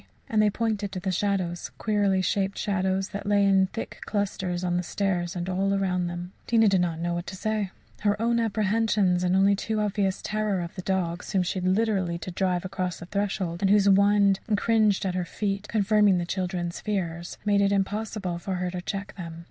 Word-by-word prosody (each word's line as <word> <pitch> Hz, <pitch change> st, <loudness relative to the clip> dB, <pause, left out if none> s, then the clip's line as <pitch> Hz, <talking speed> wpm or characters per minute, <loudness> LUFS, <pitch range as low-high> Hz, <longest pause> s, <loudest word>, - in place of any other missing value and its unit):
And 215 Hz, -1 st, +2 dB
they 210 Hz, -, +4 dB
pointed 210 Hz, -2 st, -1 dB
to 185 Hz, -, -3 dB
the 190 Hz, +1 st, -2 dB
shadows 185 Hz, -2 st, -1 dB
queerly 200 Hz, -3 st, +1 dB
shaped 195 Hz, +1 st, 0 dB
shadows 190 Hz, -1 st, 0 dB
that 200 Hz, 0 st, -6 dB
lay 205 Hz, -1 st, +4 dB
in 195 Hz, -1 st, +4 dB
thick 225 Hz, -, -7 dB
clusters 190 Hz, -3 st, -2 dB
on 175 Hz, -1 st, 0 dB
the 180 Hz, -, +1 dB
stairs 180 Hz, -1 st, -1 dB
and 175 Hz, 0 st, -3 dB
all 195 Hz, +2 st, +1 dB
around 180 Hz, -2 st, 0 dB
them. 175 Hz, +1 st, -5 dB, 0.2 s
Tina 225 Hz, -2 st, +4 dB
did 190 Hz, -2 st, +3 dB
not 170 Hz, -2 st, -1 dB
know 170 Hz, +1 st, -2 dB
what 175 Hz, 0 st, -4 dB
to -, -, -6 dB
say. 215 Hz, 0 st, -1 dB, 0.3 s
Her 205 Hz, 0 st, +1 dB
own 235 Hz, +1 st, +2 dB
apprehensions 210 Hz, -4 st, +1 dB
and 180 Hz, +1 st, +2 dB
the -, -, +4 dB
only 200 Hz, +1 st, +4 dB
too 215 Hz, +2 st, -2 dB
obvious 200 Hz, -2 st, 0 dB
terror 215 Hz, -3 st, -1 dB
of 170 Hz, 0 st, -6 dB
the 185 Hz, -, -6 dB
dogs, 180 Hz, -1 st, -2 dB
whom 190 Hz, -2 st, +3 dB
she 185 Hz, +1 st, -2 dB
had 180 Hz, -, -1 dB
literally 190 Hz, -4 st, +1 dB
to 180 Hz, -, -6 dB
drive 180 Hz, 0 st, 0 dB
across 185 Hz, -2 st, -3 dB
the -, -, -9 dB
threshold, 190 Hz, -3 st, -2 dB
and 195 Hz, -, +3 dB
who 205 Hz, -, +6 dB
whined 200 Hz, 0 st, +4 dB
and 210 Hz, -2 st, +2 dB
cringed 215 Hz, -3 st, +2 dB
at 185 Hz, -, 0 dB
her 180 Hz, 0 st, -1 dB
feet, 200 Hz, +3 st, -3 dB
confirming 210 Hz, -2 st, +3 dB
the 175 Hz, -, -1 dB
children's 180 Hz, -1 st, -3 dB
fears, 175 Hz, -5 st, -3 dB
made 205 Hz, -1 st, +3 dB
it 200 Hz, 0 st, +3 dB
impossible 200 Hz, -2 st, -1 dB
for 190 Hz, +2 st, -3 dB
her 180 Hz, 0 st, -2 dB
to 180 Hz, 0 st, -4 dB
check 195 Hz, +1 st, -5 dB
them. 165 Hz, -2 st, -7 dB
195 Hz, 210 wpm, -26 LUFS, 180-205 Hz, 0.3 s, who